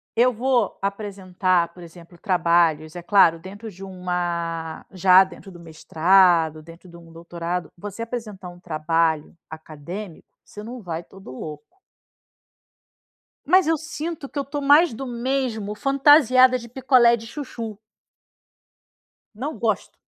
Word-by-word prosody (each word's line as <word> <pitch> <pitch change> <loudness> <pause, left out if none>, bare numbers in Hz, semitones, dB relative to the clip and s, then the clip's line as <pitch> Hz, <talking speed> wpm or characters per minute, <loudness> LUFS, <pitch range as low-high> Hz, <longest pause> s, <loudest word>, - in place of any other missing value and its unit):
eu 245 +2 +3
vou 245 -2 0
apresentar, 190 -3 -1
por 180 - -13
exemplo, 170 +1 -15
trabalhos, 170 -4 +1
é 175 - -7
claro, 175 -4 +4
dentro 205 +5 -10
de 195 0 -12
uma 175 -3 -4
já 185 0 +6
dentro 190 +1 -12
do 175 - -13
mestrado, 165 0 +2
dentro 165 +3 -15
de 170 - -13
um 165 -1 -16
doutorado, 170 +1 -5
você 205 +4 -8
apresentar 215 -6 -6
um 175 0 -14
trabalho 160 -1 -1
acadêmico, 160 +4 -9 0.2
você 210 - -11
não 240 +1 -8
vai 170 -2 -5
todo 190 -8 -14
louco. 150 +3 -8 1.8
Mas 365 +3 +4
eu 325 0 +2
sinto 320 -2 -6
que 290 - -7
eu 280 - -1
tô 285 +2 -5
mais 290 +2 +5
do 265 +4 -6
mesmo, 240 -4 -2
fantasiada 270 -1 +5
de 235 -1 -11
picolé 250 -1 +4
de 225 0 -11
chuchu. 230 -5 -7 1.6
Não 280 +8 -5
gosto. 215 -3 -2
190 Hz, 135 wpm, -22 LUFS, 170-240 Hz, 1.8 s, já